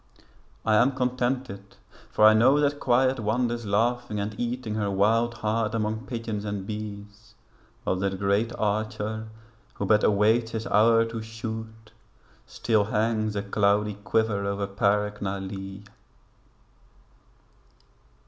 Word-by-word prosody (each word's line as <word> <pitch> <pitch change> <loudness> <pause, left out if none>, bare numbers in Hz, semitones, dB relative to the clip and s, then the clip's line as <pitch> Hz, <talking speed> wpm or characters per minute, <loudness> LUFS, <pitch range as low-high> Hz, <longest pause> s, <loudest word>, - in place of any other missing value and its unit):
I 110 -1 +4
am 130 +5 +4
contented 125 -5 -2 0.3
for 105 - +3
I 110 - +8
know 130 +6 +5
that 145 0 +1
Quiet 130 0 +2
Wanders 120 +1 -1
laughing 115 +1 0
and 100 +1 -3
eating 120 -2 -3
her 105 -2 -1
wild 115 +4 +2
heart 110 0 -1
Among 110 +2 -2
pigeons 115 -4 -4
and 100 -2 -4
bees, 105 +1 -8 0.5
while 95 - 0
that 95 0 -1
Great 100 +4 +1
Archer, 110 +1 -2 0.5
Who 100 - -3
but 105 +1 +3
awaits 110 +3 +3
His 110 0 -3
hour 115 +1 +4
to 115 0 -5
shoot, 110 0 -7 0.6
still 110 -3 +1
hangs 110 0 0
A 100 - -2
cloudy 105 +1 +1
quiver 105 0 0
over 100 0 -1
Parc 105 +1 0
na 100 -1 -2
Lee. 95 0 -7
110 Hz, 130 wpm, -26 LUFS, 100-115 Hz, 0.6 s, I